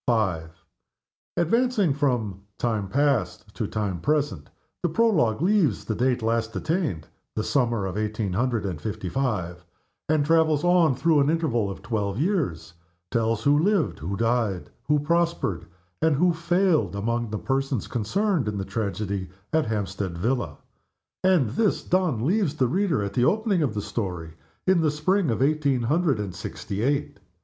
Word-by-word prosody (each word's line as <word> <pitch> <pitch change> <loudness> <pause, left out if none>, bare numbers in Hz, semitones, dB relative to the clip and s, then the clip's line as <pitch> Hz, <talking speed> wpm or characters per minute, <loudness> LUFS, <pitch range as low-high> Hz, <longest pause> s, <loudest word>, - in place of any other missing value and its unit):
V. 105 -8 +2 1.0
ADVANCING 205 - +2
from 120 -9 -1 0.2
time 110 -5 -1
past 110 -7 0
to 110 - -3
time 100 -5 -2
present, 145 - 0 0.3
the 175 - +1
Prologue 160 - +2
leaves 180 - +2
the 110 - -1
date 125 +1 0
last 115 0 0
attained 155 - -1 0.3
(the 110 - -1
summer 120 -7 +1
of 95 -1 -4
eighteen 110 -2 -2
hundred 115 +1 0
and 90 -6 -4
fifty 100 -4 -4
five), 90 -8 -2 0.5
and 155 -2 +3
travels 160 -2 +3
on 175 -5 +4
through 155 +3 +3
an 140 +1 +3
interval 140 -11 +1
of 100 - -8
twelve 105 -4 -2
years 135 - -1 0.4
tells 115 -2 0
who 145 +1 +4
lived, 165 - +1
who 95 +6 -4
died, 115 -5 0
who 150 - +3
prospered, 155 - 0 0.3
and 160 -2 +3
who 175 +4 +3
failed 170 - +1
among 115 +3 -1
the 110 - -3
persons 135 -1 -1
concerned 170 - 0
in 105 -1 -2
the 95 - -3
tragedy 100 -3 -3 0.2
at 160 -1 +3
the - - -5
Hampstead 95 -4 -3
villa 95 - -1 0.7
and, 175 - +3
this 210 - +1
done, 165 -11 +1
leaves 180 -3 +1
the 130 -5 +2
reader 165 - +1
at 100 0 -4
the 120 - +2
opening 210 - +2
of 130 -8 0
THE 105 - -2
STORY 90 -7 -4 0.3
in 185 -2 +4
the 155 - +3
spring 160 +4 +1
of 115 +3 +1
eighteen 140 -4 +1
hundred 150 0 +1
and 100 -4 -4
sixty 100 +3 -5
eight. 140 -3 -1
125 Hz, 160 wpm, -25 LUFS, 105-160 Hz, 1.0 s, on